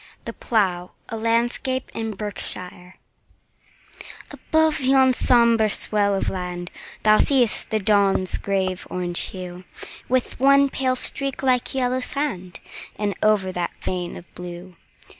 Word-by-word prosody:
The -, -, -5 dB
Plough 185 Hz, -6 st, -1 dB, 0.2 s
A 230 Hz, -, -4 dB
LANDSCAPE 235 Hz, +3 st, -1 dB
IN 225 Hz, -2 st, -4 dB
BERKSHIRE 185 Hz, -3 st, -5 dB, 1.4 s
ABOVE 315 Hz, -1 st, +1 dB
yon 265 Hz, -1 st, +4 dB
sombre 235 Hz, -3 st, +4 dB
swell 205 Hz, -1 st, +1 dB
of 195 Hz, -, -2 dB
land 180 Hz, -1 st, -5 dB, 0.3 s
Thou 215 Hz, 0 st, +5 dB
see'st 250 Hz, -6 st, +2 dB
the 220 Hz, -, 0 dB
dawn's 200 Hz, -2 st, +2 dB
grave 190 Hz, -2 st, -2 dB
orange 175 Hz, -1 st, -2 dB
hue, 180 Hz, -1 st, -8 dB, 0.5 s
With 255 Hz, -2 st, -1 dB
one 275 Hz, +1 st, +5 dB
pale 260 Hz, -1 st, 0 dB
streak 275 Hz, +1 st, 0 dB
like 255 Hz, -1 st, +1 dB
yellow 255 Hz, -1 st, 0 dB
sand, 250 Hz, -, -4 dB, 0.4 s
And 205 Hz, -1 st, -2 dB
over 210 Hz, -3 st, +2 dB
that 175 Hz, -1 st, -3 dB
a -, -, -16 dB
vein 180 Hz, -1 st, -3 dB
of 175 Hz, -, -11 dB
blue. 180 Hz, 0 st, -9 dB
215 Hz, 130 wpm, -22 LUFS, 185-255 Hz, 1.4 s, Thou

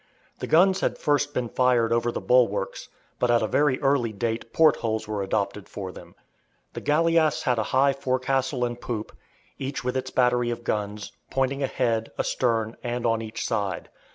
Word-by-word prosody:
The -, -, -4 dB
guns 190 Hz, +4 st, +4 dB
had -, -, 0 dB
first 145 Hz, -1 st, +1 dB
been 125 Hz, -4 st, -2 dB
fired 120 Hz, -2 st, +2 dB
over 120 Hz, 0 st, +1 dB
the -, -, -3 dB
bulwarks, 125 Hz, -1 st, +1 dB, 0.3 s
but 125 Hz, -, +1 dB
at 120 Hz, -1 st, +3 dB
a -, -, +1 dB
very 140 Hz, +4 st, +2 dB
early 135 Hz, -5 st, +2 dB
date 115 Hz, +2 st, -3 dB
port 160 Hz, -2 st, +5 dB
holes 110 Hz, -2 st, -2 dB
were 105 Hz, -2 st, -2 dB
adopted 100 Hz, 0 st, -2 dB
for 95 Hz, -3 st, -6 dB
them. -, -, -13 dB, 0.6 s
The -, -, -6 dB
galleass 160 Hz, +1 st, +2 dB
had 125 Hz, -2 st, +1 dB
a -, -, +1 dB
high 135 Hz, +1 st, +3 dB
forecastle 130 Hz, -1 st, 0 dB
and 120 Hz, 0 st, -5 dB
poop, 110 Hz, -3 st, -5 dB, 0.4 s
each 135 Hz, 0 st, -4 dB
with 125 Hz, +1 st, -2 dB
its 130 Hz, 0 st, -2 dB
battery 125 Hz, -1 st, +2 dB
of 120 Hz, 0 st, -4 dB
guns, 105 Hz, -1 st, -3 dB, 0.2 s
pointing 135 Hz, +1 st, 0 dB
ahead, 115 Hz, -4 st, 0 dB
astern, 115 Hz, -3 st, 0 dB
and 120 Hz, 0 st, -3 dB
on 115 Hz, -1 st, +1 dB
each 110 Hz, -1 st, -5 dB
side. 100 Hz, -6 st, -2 dB
120 Hz, 180 wpm, -25 LUFS, 115-135 Hz, 0.6 s, port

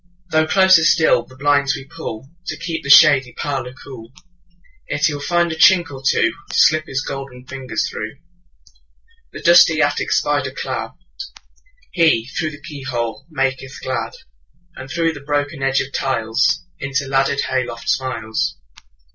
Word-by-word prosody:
Though 155 Hz, 0 st, +2 dB
closer 185 Hz, -1 st, +5 dB
still 160 Hz, 0 st, +3 dB
the 130 Hz, -, -17 dB
blinds 140 Hz, 0 st, +2 dB
we 135 Hz, -, -9 dB
pullTo 160 Hz, +2 st, -8 dB
keep 165 Hz, -1 st, -4 dB
the 140 Hz, -, -7 dB
shady 140 Hz, -4 st, +6 dB
parlour 130 Hz, -3 st, -4 dB
cool, 120 Hz, -4 st, -11 dB, 0.8 s
Yet 150 Hz, +1 st, 0 dB
he 155 Hz, -, +1 dB
will 145 Hz, -, -6 dB
find 175 Hz, +2 st, +1 dB
a -, -, -3 dB
chink 175 Hz, 0 st, +5 dB
or 135 Hz, -1 st, -9 dB
twoTo 115 Hz, -3 st, +2 dB, 0.2 s
slip 155 Hz, -1 st, +3 dB
his 135 Hz, 0 st, -3 dB
golden 135 Hz, -2 st, -7 dB
fingers 130 Hz, -1 st, -3 dB
through. 110 Hz, +3 st, -6 dB, 1.2 s
The -, -, -10 dB
dusty -, -, +6 dB
attic -, -, 0 dB
spider -, -, +1 dB
cladHe, -, -, -5 dB, 1.0 s
through 155 Hz, -, +1 dB
the 145 Hz, -1 st, -13 dB
keyhole, 130 Hz, -6 st, -5 dB
maketh 135 Hz, -3 st, -3 dB
glad; 120 Hz, -4 st, -3 dB, 0.6 s
And 130 Hz, 0 st, -9 dB
through 165 Hz, +1 st, 0 dB
the -, -, -9 dB
broken 145 Hz, 0 st, -2 dB
edge 135 Hz, 0 st, +1 dB
of 135 Hz, +1 st, -7 dB
tiles, 130 Hz, +5 st, 0 dB
Into 140 Hz, +1 st, -2 dB
the 135 Hz, -, -9 dB
laddered 135 Hz, +1 st, +1 dB
hay 130 Hz, -1 st, -1 dB
loft 115 Hz, -1 st, -9 dB
smiles. 130 Hz, +4 st, -2 dB
140 Hz, 150 wpm, -19 LUFS, 130-155 Hz, 1.2 s, shady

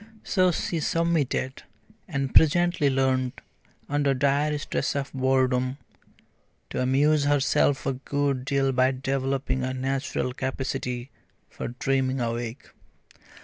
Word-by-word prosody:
So 185 Hz, -1 st, +3 dB
she 170 Hz, 0 st, -2 dB
submitted, 155 Hz, -5 st, 0 dB, 0.5 s
and 140 Hz, -6 st, -2 dB
presently 165 Hz, -1 st, +4 dB
learnt, 130 Hz, -1 st, 0 dB, 0.5 s
under 145 Hz, -1 st, +1 dB
dire 145 Hz, +3 st, +1 dB
stress 145 Hz, -, -2 dB
of 140 Hz, -1 st, -3 dB
boredom, 130 Hz, -1 st, +1 dB, 0.9 s
to -, -, -1 dB
amuse 145 Hz, +3 st, +3 dB
herself 145 Hz, 0 st, +2 dB
a 135 Hz, -, +1 dB
good 140 Hz, 0 st, -1 dB
deal 135 Hz, 0 st, +1 dB
by 130 Hz, 0 st, +3 dB
developing 135 Hz, 0 st, -1 dB
a 130 Hz, 0 st, -2 dB
natural 135 Hz, -1 st, -2 dB
capacity 130 Hz, -1 st, -3 dB, 0.4 s
for -, -, -5 dB
dreaming 130 Hz, +2 st, 0 dB
awake. 120 Hz, +1 st, -4 dB
135 Hz, 110 wpm, -26 LUFS, 130-145 Hz, 0.9 s, presently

